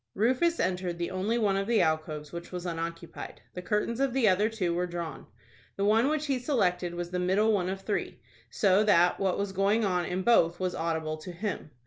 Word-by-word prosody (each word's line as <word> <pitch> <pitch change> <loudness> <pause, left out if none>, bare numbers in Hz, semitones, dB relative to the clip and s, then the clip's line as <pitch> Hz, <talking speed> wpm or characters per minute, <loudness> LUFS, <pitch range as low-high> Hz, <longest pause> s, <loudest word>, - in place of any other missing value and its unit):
Rufus 260 - +2
entered 180 -2 -1
the 170 +1 -3
only 195 +5 -1
one 205 -4 +2
of 195 +1 -1
the 230 -2 +3
alcoves 155 -2 -2
which 170 0 -8
was 180 -1 -5
unoccupied. 165 0 -6
The 180 - -6
curtains 210 +5 -1
of 270 -2 +1
the 260 -4 +3
other 205 +3 +3
two 190 -6 -1
were 180 +1 -1
drawn. 170 -2 -6 0.5
The 200 - -1
one 220 +5 +4
which 305 0 -1
he 270 -3 0
selected 180 - 0
was 175 0 -5
the 180 - -1
middle 200 +5 +2
one 185 -3 0
of 190 0 -4
three, 205 +1 -3 0.3
so 200 -1 +3
that 180 -4 +4
what 190 -2 +1
was 200 -1 -2
going 200 +3 +2
on 180 -2 0
in 180 +2 -2
both 175 -7 +4
was 185 -1 -1
audible 160 -1 -2
to 155 +3 -8
him. 185 -2 -4
185 Hz, 210 wpm, -29 LUFS, 175-215 Hz, 0.5 s, one